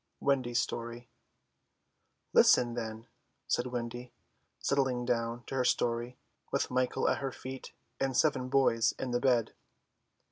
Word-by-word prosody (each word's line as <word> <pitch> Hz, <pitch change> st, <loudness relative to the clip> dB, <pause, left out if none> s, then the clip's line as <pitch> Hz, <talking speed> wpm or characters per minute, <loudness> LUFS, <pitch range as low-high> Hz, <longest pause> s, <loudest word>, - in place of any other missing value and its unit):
WENDY'S 130 Hz, -4 st, +1 dB
STORY 120 Hz, 0 st, -4 dB, 1.3 s
"Listen, 120 Hz, -1 st, +5 dB
then," 110 Hz, -1 st, -5 dB, 0.4 s
said 120 Hz, -, 0 dB
Wendy, 120 Hz, 0 st, -5 dB, 0.5 s
settling 130 Hz, -3 st, 0 dB
down 120 Hz, -1 st, -1 dB
to -, -, -8 dB
her 130 Hz, -1 st, +1 dB
story, 120 Hz, 0 st, 0 dB, 0.3 s
with -, -, 0 dB
Michael 130 Hz, 0 st, +1 dB
at -, -, +2 dB
her 135 Hz, -1 st, -3 dB
feet 130 Hz, +1 st, -8 dB, 0.3 s
and 135 Hz, -2 st, 0 dB
seven 130 Hz, -5 st, +2 dB
boys 125 Hz, -4 st, +3 dB
in 130 Hz, -, -3 dB
the 120 Hz, -, +1 dB
bed. 120 Hz, -4 st, +2 dB
125 Hz, 130 wpm, -31 LUFS, 120-130 Hz, 1.3 s, Listen